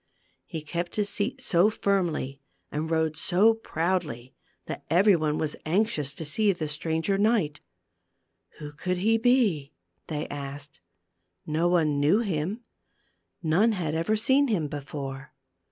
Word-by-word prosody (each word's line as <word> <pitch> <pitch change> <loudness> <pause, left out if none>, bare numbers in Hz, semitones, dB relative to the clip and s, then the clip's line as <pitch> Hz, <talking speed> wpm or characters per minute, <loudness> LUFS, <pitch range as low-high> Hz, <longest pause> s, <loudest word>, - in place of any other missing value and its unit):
He 160 -4 -5
kept 170 +3 -4
his 210 -1 0
seat 205 0 -2
so 180 +3 +4
firmly 175 -10 -1 0.3
and 155 +2 -2
rode 160 -1 +1
so 185 +7 +4
proudly 165 - -2 0.3
that - - -6
every 190 +4 +5
one 155 -2 0
was 155 -2 -1
anxious 160 - 0
to 160 - -6
see 205 +8 +2
the 170 -4 -3
stranger 160 +6 -1
knight. 205 -9 +2 1.0
Who 150 -1 -7
could 180 +5 -2
he 225 +5 +2
be? 220 - +2 0.3
they 150 -1 -3
asked. 145 -1 -7 0.6
Ho 160 +3 +1
one 160 -5 +2
knew 155 +10 +4
him; 195 +3 -2 0.8
none 185 +8 +3
had 170 -6 -2
ever 165 +7 +1
seen 265 +6 +3
him 185 - 0
before. 140 -1 -6
165 Hz, 135 wpm, -27 LUFS, 150-200 Hz, 1.0 s, every